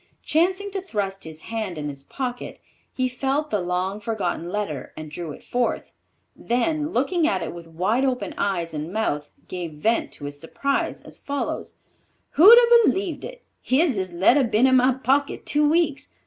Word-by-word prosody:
Chancing 370 +5 +1
to 390 0 -3
thrust 200 - -3
his 160 0 -9
hand 215 -6 -4
in 150 -1 -4
his 140 -2 -6
pocket, 245 - -5 0.3
he 255 -1 0
felt 270 +4 -1
the 210 -3 +1
long 180 +3 -2
forgotten 200 -6 -3
letter 180 -9 -4
and 155 -1 -8
drew 165 0 -5
it - - -11
forth, 245 -1 -1 0.4
then 295 +5 0
looking 310 +7 +1
at 335 - 0
it - - -5
with 170 -1 -10
wide 185 +10 0
open 250 -8 -1
eyes 175 -5 -1
and 155 +2 -4
mouth, 150 -9 -1 0.2
gave 175 -3 -5
vent 220 +10 0
to 145 - -7
his 145 0 -7
surprise 275 - -2
as - - -8
follows: 285 0 -4 0.5
"Who'd 410 +10 +9
a 475 -1 +6
b'leved 375 -6 -2
it! - - -9 0.2
Here's 290 +3 +2
this 190 -3 -3
letter 200 +11 +4
been 230 +1 +3
in 260 0 +5
my 255 0 +4
pocket 270 +2 0
two 295 0 +2
weeks. 320 -3 +1
235 Hz, 175 wpm, -24 LUFS, 175-290 Hz, 0.5 s, Who'd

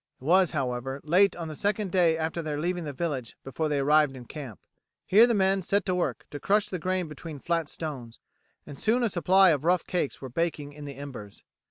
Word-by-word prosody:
It - - -17
was, 180 +4 +4
however, 135 -2 -3
late 185 +6 +4
on 170 -2 -5
the 155 - -6
second 205 +2 -1
day 170 -3 +3
after 160 +1 -2
their 150 -2 -3
leaving 175 +1 -2
the 145 - -4
village 140 -5 -4
before 150 +4 -3
they 145 - 0
arrived 145 0 +3
in 125 - -10
camp. 130 -6 -8 0.5
Here 220 +5 +6
the 235 - +1
men 195 -1 +2
set 200 +3 0
to 185 - 0
work 180 -1 -2
to 145 - -6
crush 210 +4 +1
the 185 - -4
grain 185 +1 -1
between 155 +1 -8
flat 165 +1 -1
stones, 130 -8 -7 0.5
and 145 -2 -10
soon 235 +3 +2
a 235 - +2
supply 185 +2 +5
of 145 -2 0
rough 175 +1 +2
cakes 175 -6 -2
were 135 - -7
baking 150 0 -2
in 150 0 -10
the 140 -1 -7
embers. 125 -8 -9
160 Hz, 220 wpm, -27 LUFS, 140-185 Hz, 0.5 s, Here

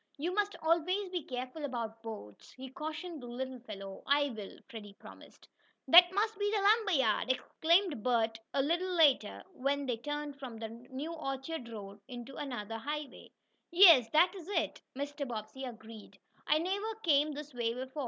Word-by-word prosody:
You 335 +5 -2
must 410 +1 0
always 355 +5 +1
be 360 -2 -2
careful 255 +3 -6
about 230 -5 -4
boats," 215 - -9
he 260 0 -9
cautioned 310 +2 -6
the 245 - -8
little 255 +1 -5
fellow. 195 -4 -8
"I 285 0 +3
will," 210 -4 -8
Freddie 215 -5 -9
promised. - - -15 0.4
"That 350 +1 +9
must 425 +2 0
be 410 0 +1
the 425 0 +1
lumber 415 0 +4
yard!" 255 -3 +2
exclaimed 330 - +1
Bert 225 -2 +1
a 275 - +1
little 350 +5 0
later, 280 -10 +3
when 280 -1 -1
they 245 -3 -1
turned 295 +2 -5
from 250 -4 -7
the 225 0 -5
new 260 +7 -7
orchard 270 -3 -5
road 200 -2 -9
into 245 0 -8
another 225 -6 -5
highway. 295 +3 -6 0.4
"Yes, 335 - +8
that 350 +6 +4
is 365 -4 -10
it," 405 - -1
Mr. 285 +1 -4
Bobbsey 230 +3 -6
agreed. 225 -3 -10 0.3
"I 305 - +4
never 400 +7 -2
came 300 -2 +3
this 295 0 -8
way 235 -1 -1
before. 260 +3 -6
275 Hz, 170 wpm, -32 LUFS, 235-330 Hz, 0.4 s, That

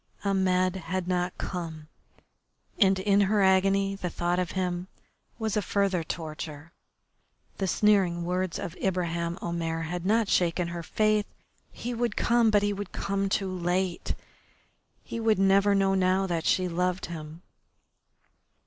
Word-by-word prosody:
Ahmed 185 -1 +2
had 185 +1 -3
not 180 0 -1
come, 160 -4 -5 0.9
and 195 -3 +5
in 200 +1 +3
her 200 +1 +3
agony 195 +1 +3
the 185 -2 -4
thought 175 +1 -1
of 180 -1 -2
him 180 -1 -2 0.5
was 220 -2 -2
a 210 - +2
further 195 -2 0
torture. 155 -1 -6 0.9
The 195 - 0
sneering 185 -4 +2
words 180 0 -1
of 185 -3 -5
Ibraheim 170 -2 -1
Omair 165 -1 -2
had 175 +2 -4
not 220 +3 +2
shaken 175 -1 +1
her 170 0 -5
faith. 215 +4 +1 0.4
He 245 - -5
would 235 -2 -1
come, 235 -1 +3
but 205 -1 +3
he 205 0 +1
would 200 -1 -6
come 200 0 -1
too 195 -1 -1
late. 180 0 -1 0.9
He 230 - -5
would 225 -1 +2
never 195 +1 +4
know 195 -1 +3
now 190 0 +2
that 170 -3 -2
she 185 -1 +2
loved 180 +1 -1
him. 160 0 -8
185 Hz, 145 wpm, -27 LUFS, 175-200 Hz, 0.9 s, and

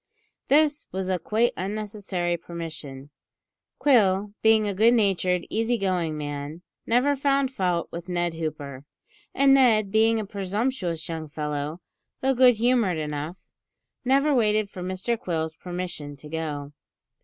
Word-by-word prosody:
This 295 +1 +3
was 190 0 -3
a 185 -1 0
quite 225 +7 +1
unnecessary 195 -3 -3
permission. 155 -5 -8 0.7
Quill, 205 -7 +3
being 220 -1 +4
a 200 - -1
good 225 +5 +5
natured, 185 -4 +1
easy 225 +2 +1
going 180 -6 -1
man, 145 +3 -5 0.2
never 255 +5 +3
found 275 -1 +1
fault 180 -6 0
with 170 +2 -7
Ned 175 -1 0
Hooper, 150 -4 -5 0.5
and 275 0 +5
Ned 220 -7 +4
being 225 +1 +3
a 215 - -3
presumptuous 200 -3 -2
young 160 -2 -5
fellow, 150 +2 -4 0.4
though 270 +1 +2
good 250 -1 +6
humoured 230 -6 +2
enough, 150 +3 -4 0.6
never 275 +3 +3
waited 215 -4 +2
for 185 - -8
Mr 185 +6 -2
Quill's 160 -2 -2
permission 175 -5 -6
to 150 - -12
go. 150 -2 -4
185 Hz, 135 wpm, -25 LUFS, 160-225 Hz, 0.7 s, good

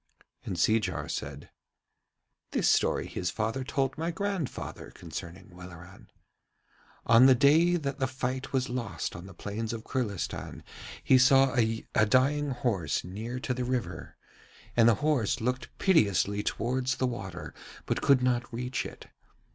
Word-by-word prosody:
And - - -4
Seejar 90 -9 +1
said: 70 0 -6 1.0
'This - - 0
story - - +2
his 90 - -3
father 115 +4 -2
told 135 +1 -1
my 165 +1 -1
grandfather 190 -4 -4
concerning 90 +4 -9
Welleran. 90 0 -12 1.0
On 120 +3 +7
the 130 - +7
day 160 +7 +5
that 140 -4 -3
the 130 - +1
fight 130 0 -4
was 130 -1 0
lost 120 -4 -4
on 85 +2 -9
the 100 - -13
plains 110 +4 -4
of 110 -1 -6
Kurlistan 110 -9 -4 0.4
he 130 - +5
saw 135 +1 +5
a 115 -2 +1 0.2
dying 140 +5 +2
horse 115 - -1
near 110 +7 -5
to 130 - -1
the 125 0 -3
river, 120 -9 -4 0.6
and 115 -1 +6
the 115 - +4
horse 140 -9 +1
looked 125 +3 -2
piteously 105 - +2
towards 130 +5 -1
the 130 - 0
water 95 -8 -5 0.3
but - - -1
could 135 -3 +4
not 120 -1 0
reach 125 +2 -3
it. - - -12
125 Hz, 145 wpm, -29 LUFS, 100-130 Hz, 1.0 s, On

